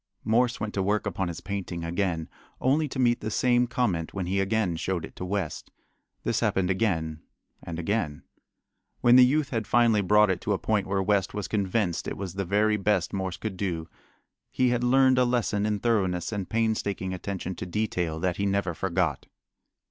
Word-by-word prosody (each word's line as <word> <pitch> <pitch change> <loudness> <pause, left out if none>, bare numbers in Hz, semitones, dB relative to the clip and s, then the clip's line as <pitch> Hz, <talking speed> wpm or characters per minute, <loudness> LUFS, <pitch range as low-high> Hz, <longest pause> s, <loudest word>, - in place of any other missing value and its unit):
Morse 120 +2 +2
went 110 -1 -3
to 100 - 0
work 105 +3 0
upon 95 -2 -2
his 85 -2 -6
painting 95 -4 -4
again, 85 -2 -1 0.3
only 150 +4 +2
to 135 - -7
meet 120 -2 +3
the 110 - -3
same 120 +2 +2
comment 100 -10 -1
when 95 -2 -2
he 95 +2 0
again 95 -2 +1
showed 85 0 -2
it - - -14
to - - -6
West. 100 +2 -3 0.5
This - - 0
happened 95 -1 +1
again 80 -6 -1 0.4
and 85 -1 -6
again. 85 -4 -2 0.8
When 120 0 +6
the 130 - +9
youth 140 +3 +2
had 115 -4 -2
finally 115 -3 +4
brought 105 +1 +4
it 90 - -2
to 105 - 0
a - - +1
point 105 -1 0
where 95 0 0
West 100 -1 +1
was 105 - -3
convinced 100 -3 -1
it - - -4
was 95 -3 -5
the 95 0 -3
very 105 +3 +2
best 100 -3 0
Morse 95 -2 -3
could 105 -4 -5
do 85 -4 -2 0.6
he 130 -1 +2
had 125 0 0
learned 130 +1 +4
a - - +5
lesson 115 -4 0
in 105 -1 0
thoroughness 95 -6 0
and 100 -5 -4
painstaking 105 -4 -1
attention 95 0 -4
to 90 - -5
detail 90 -5 -2
that 90 0 -1
he 100 - 0
never 100 -3 0
forgot. 85 -4 -1
100 Hz, 195 wpm, -27 LUFS, 90-110 Hz, 0.8 s, the